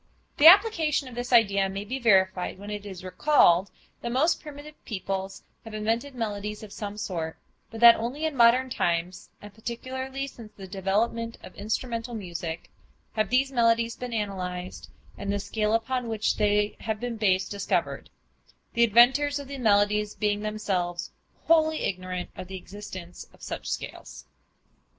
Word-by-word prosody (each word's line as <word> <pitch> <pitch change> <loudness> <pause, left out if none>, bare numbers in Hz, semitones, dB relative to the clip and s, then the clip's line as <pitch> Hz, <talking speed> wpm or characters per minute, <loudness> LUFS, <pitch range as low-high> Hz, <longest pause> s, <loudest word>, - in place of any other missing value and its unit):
The 300 - +8
application 335 - +6
of 255 - -10
this 245 +2 -5
idea 200 -5 +4
may 195 +1 -5
be 255 +5 -4
verified 190 -6 +2
when 205 +2 -8
it 205 0 -6
is 185 -2 -8
recalled 185 - +4 0.3
that 235 - -3
most 285 +7 +2
primitive 300 0 -11
peoples 195 -2 -4 0.2
have 225 -1 -9
invented 230 +6 -2
melodies 210 -2 -4
of 210 - -10
some 205 -1 -6
sort, 170 -6 -4 0.3
but 225 0 -9
that 235 -1 +9
only 250 +8 -3
in 315 -2 -2
modern 250 +2 +5
times, 175 -2 -1
and 205 -1 -11
particularly 260 +4 -5
since 230 -5 -11
the 195 - -8
development 210 +5 -1
of - - -11
instrumental 230 +3 -3
music, 170 -5 -6 0.4
have 215 -1 0
these 265 +2 +2
melodies 230 -2 +2
been 250 -1 -6
analyzed, 185 -4 -4 0.3
and 200 0 -2
the 205 - 0
scale 215 +2 0
upon 245 +2 -1
which 220 -1 0
they 210 0 +1
have 220 -2 -3
been 240 -1 -4
based, 190 -3 +1
discovered, 200 -1 -2 0.6
the 235 - +4
inventors 255 +6 +5
of 285 -1 -7
the 275 0 -7
melodies 210 -2 +2
being 210 -1 0
themselves 190 -5 -2 0.3
wholly 315 -1 +3
ignorant 185 -1 -3
of 185 - -8
the 190 +1 -6
existence 185 -2 -9
of - - -19
such - - -5
scales. - - -6
215 Hz, 160 wpm, -26 LUFS, 195-245 Hz, 0.6 s, that